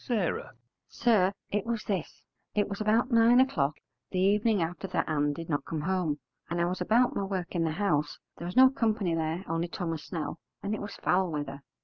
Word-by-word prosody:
S. 215 -7 0 0.5
Sir, 215 -6 +3 0.2
it 205 -1 0
was 230 -2 -2
this. 190 -6 -3 0.3
It 205 -1 +2
was 200 +1 -5
about 225 +4 +2
nine 230 +1 +6
o'clock 155 - +2 0.3
the 185 - -4
evening 205 +3 +3
after 175 +3 -2
that 185 - -1
Ann 145 -2 +1
did 165 +2 -6
not 145 -3 -1
come 155 +1 -4
home, 175 -3 0 0.3
and 170 - -1
I 170 - +3
was 180 +1 -2
about 245 +5 +3
my - - 0
work 190 -3 -3
in 170 -2 +1
the 160 - 0
house; 155 -6 0 0.2
there 170 - -6
was 180 - -6
no 260 0 +8
company 215 -8 0
there 165 +3 -2
only 165 +1 -1
Thomas 165 -3 -4
Snell, 165 -1 -4 0.2
and 200 +1 -1
it 215 - -3
was 205 -1 -6
foul 185 -1 +1
weather. 145 -2 -4
185 Hz, 210 wpm, -29 LUFS, 165-215 Hz, 0.5 s, no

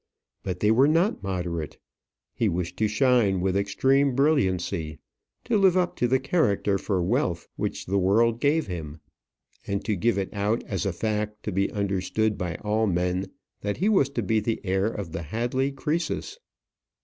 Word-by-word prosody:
But 90 -1 -4
they 105 - +4
were 130 +5 +5
not 165 - +2
moderate. 90 -5 -3 0.6
He 115 - +1
wished 90 0 -3
to 110 - +2
shine 105 -3 +3
with 95 +1 0
extreme 135 +7 +2
brilliancy; 95 - +1 0.5
to 220 -3 +1
live 190 -2 +4
up 180 -1 +1
to 120 - +2
the 130 +2 +3
character 105 - +1
for 95 -2 -1
wealth 90 - 0
which - - -3
the 100 +2 +1
world 115 +5 +3
gave 150 +3 +2
him; 80 -5 -6 0.7
and 100 0 -2
to 110 - 0
give 115 +4 +1
it 95 -1 -3
out 105 +3 0
as 100 0 -3
a - - +1
fact 105 +2 -3
to 105 - -3
be 100 +1 0
understood 100 +2 0
by 90 -3 -3
all 110 +1 +1
men 90 +1 0 0.3
that 100 0 -2
he 200 - +2
was 190 -11 +3
to 120 - +1
be 110 +3 +2
the 110 +1 -2
heir 95 +1 +1
of 100 -6 -5
the 80 - -4
Hadley 120 - -1
Croesus. 155 - -3
105 Hz, 175 wpm, -26 LUFS, 95-125 Hz, 0.7 s, were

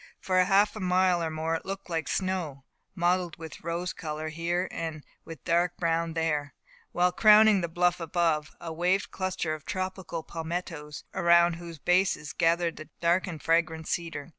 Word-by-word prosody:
For 185 -1 +2
half 200 +2 +3
a - - -6
mile 185 -1 +2
or 165 - -1
more 160 +1 -2
it 165 - -2
looked 195 0 -6
like 165 -3 -2
snow, 180 -8 -2 0.3
mottled 175 -1 0
with 160 -1 -9
rose 170 +2 -3
colour 155 -1 -5
here, 170 +3 -1
and 160 -3 -5 0.2
with 165 - -10
dark 175 0 +1
brown 165 -1 0
there; 150 -4 -1 0.4
while, 180 +1 +2
crowning 215 0 +6
the 170 - -1
bluff 175 +1 +1
above, 165 -2 0
waved 175 +4 0
a - - -18
cluster 185 -4 -2
of 155 -2 -7
tropical 185 -3 -4
palmettoes, 165 -2 -5
around 170 0 +4
whose 170 -1 -9
bases 180 -2 +1
gathered 170 0 +1
the 155 - -10
dark 175 +3 +2
and 165 -5 -7
fragrant 165 -1 +1
cedar. 165 -3 -3
170 Hz, 165 wpm, -28 LUFS, 160-180 Hz, 0.4 s, crowning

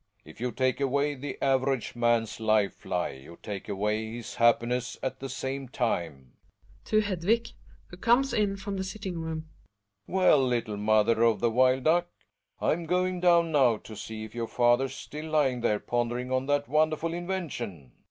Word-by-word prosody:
If 80 +8 -13
you 125 0 -1
take 130 +1 0
away 140 +2 +1
the 140 0 -6
average 135 -3 +1
man's 115 -2 +1
life 110 -3 +1
lie - - -1
you 70 +6 -13
take 100 0 -6
away 105 +2 -1
his 120 -2 -7
happiness 120 +1 +2
at 130 - -3
the 135 - -6
same 135 +1 -4
time. 80 - -2 0.5
{To 215 0 +3
Hedvig, 205 +3 0 0.4
who 175 - -11
comei^ 240 +6 +3
in 205 -2 +1
from 195 0 -5
the 190 - -2
sitting 190 -2 -5
room.) 160 -1 -5 0.6
Well, 180 -6 +4
little 120 -4 -1
mot 105 +1 +3
her 115 -1 +2
of 115 -3 +4
the 120 +2 +1
wild 130 +2 +3
duck. 175 +2 +3 0.5
I'm 165 +1 0
going 180 +1 +1
down 170 -2 +4
now 130 -7 +4
to 110 - -11
see 110 +1 -7
if 110 - -10
our 115 -1 -2
father's 125 +3 +2
still 155 +1 -8
tying 135 -5 +2
there 105 -3 +1
pon 120 0 -1
dering 125 +1 -4
on 130 +1 0
that 145 0 +1
wonderful 155 +3 +1
invention. 150 - -5
130 Hz, 175 wpm, -28 LUFS, 115-165 Hz, 0.6 s, Well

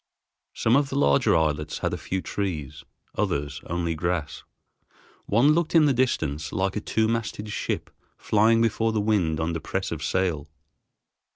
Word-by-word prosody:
Some 115 - +2
of 140 0 +2
the 135 - -4
larger 70 - +3
islets 75 -1 0
had - - -2
a - - -2
few 95 0 -3
trees, 80 -7 -4 0.3
others 70 0 -2
only 85 0 -1
grass. 80 -3 -2 0.9
One 120 +8 +4
looked 170 +1 +1
in 160 -2 +7
the 140 - +3
distance 80 - -1
like 95 +1 -1
a 105 - -2
two 110 0 0
masted 110 -2 -3
ship - - -3 0.3
flying 115 +2 +3
before 115 0 +1
the 110 - +1
wind 100 -7 +1
under 80 +1 -1
press 95 +4 -3
of 80 -2 -4
sail. 85 -6 -1
95 Hz, 160 wpm, -25 LUFS, 80-115 Hz, 0.9 s, in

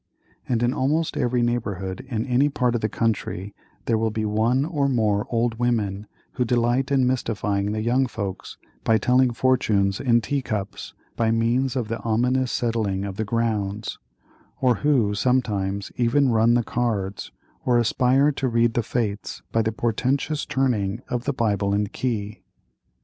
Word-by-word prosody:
And 120 -2 +1
in 120 +1 +2
almost 155 +5 0
every 120 0 +1
neighborhood 100 -6 -2
in 115 -2 -2
any 135 +3 +2
part 125 -4 0
of 120 - -1
the 110 - 0
country, 105 -3 -2 0.3
there 115 -2 +1
will 110 0 +1
be 110 0 -2
one 115 +6 +1
or 145 -4 0
more 105 -5 +1
old 115 -1 0
women 105 -4 -1 0.2
who 125 - -1
delight 120 +2 +1
in 135 -2 +3
mystifying 105 -5 -1
the 110 0 -2
young 125 +3 +2
folks 100 -5 -6 0.3
by 115 - +4
telling 125 +3 +3
fortunes 110 -6 +1
in 120 -3 +3
tea 140 +5 -2
cups, 105 -5 -5 0.2
by 115 -1 +1
means 120 +4 +1
of 125 -4 -1
the 115 +1 -3
ominous 125 +3 +1
settling 110 -5 -1
of 100 -1 -6
the 110 - 0
"grounds;"—or 105 - -3
who, 130 -8 +2
sometimes, 100 -4 0
even 125 +3 +3
"run 115 0 +4
the 120 - +2
cards," 105 - -2 0.3
or 125 -2 +3
aspire 130 +5 +3
to 135 -2 -2
read 115 0 +2
the 120 - +1
fates 105 -3 -3
by 115 - +2
the 110 0 0
portentous 130 +7 -1
turning 120 -4 0
of 125 0 -2
the 145 - +1
Bible 100 -5 0
and 105 0 -1
key. 105 -5 -3
115 Hz, 160 wpm, -24 LUFS, 105-125 Hz, 0.3 s, by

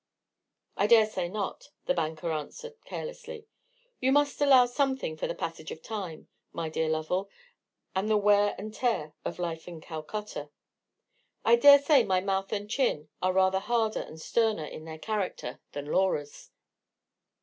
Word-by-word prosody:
"I 205 - +2
dare 225 -1 +7
say 185 -5 -3
not," 205 +7 -4 0.2
the - - +2
banker 160 -3 -2
answered, 455 - -5
carelessly; 470 -2 -7 0.5
"you 260 +1 +2
must 290 +1 +2
allow 265 -3 +7
something 265 - -1
for 155 - -3
the - - -4
passage 165 -1 -5
of 160 - -8
time, 190 -8 -6 0.2
my 165 -1 -3
dear 160 0 -1
Lovell, 160 +5 -1 0.7
and 195 +3 0
the 215 - +4
wear 205 0 +4
and 215 +2 -7
tear 220 -12 -1
of - - -4
a - - -6
life 165 -1 -4
in 170 -2 -8
Calcutta. 155 0 -6 1.0
I 230 - +7
dare 285 +4 +9
say 280 -2 +5
my 185 -3 +2
mouth 195 0 -1
and 205 -1 -2
chin 210 - 0
are 185 - +2
rather 190 0 +3
harder 225 +1 0
and 160 - -10
sterner 220 -2 +1
in 155 - -9
their 160 -1 -7
character 195 - -3
than 145 0 -5
Laura's." 150 -3 -1
195 Hz, 160 wpm, -29 LUFS, 160-230 Hz, 1.0 s, dare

